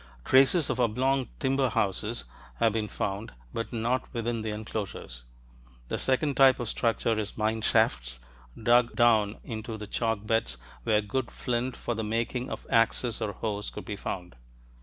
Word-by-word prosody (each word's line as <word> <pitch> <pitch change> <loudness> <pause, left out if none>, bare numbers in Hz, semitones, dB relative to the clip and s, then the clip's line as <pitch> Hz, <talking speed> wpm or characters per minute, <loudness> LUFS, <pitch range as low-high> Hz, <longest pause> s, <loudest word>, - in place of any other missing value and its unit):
Traces 135 +4 +5
of - - -3
oblong 130 +2 +1
timber 135 -1 +2
houses 95 - -1 0.3
have 115 - +2
been 110 -1 -1
found, 100 - -3 0.2
but 115 - -3
not 120 +2 -1
within 115 0 -1
the 110 - -3
enclosures. 105 - -5 0.6
The - - -2
second 140 +2 +1
type 135 -1 +6
of 120 - -3
structure 115 -1 +1
is 105 -1 -5
mine 110 +1 0
shafts, - - +1 0.4
dug 120 +1 +4
down 110 -3 +4
into 110 0 -5
the 105 - -6
chalk 110 0 -1
beds 110 - 0 0.3
where 105 -1 +3
good 120 +4 -2
flint 125 +1 -2
for 120 - -2
the 110 0 -3
making 115 +3 -1
of - - -6
axes 115 0 +2
or 105 -2 -1
hoes 105 +1 -3
could - - -8
be 105 - -4
found. 90 -7 -5
115 Hz, 160 wpm, -28 LUFS, 105-120 Hz, 0.6 s, type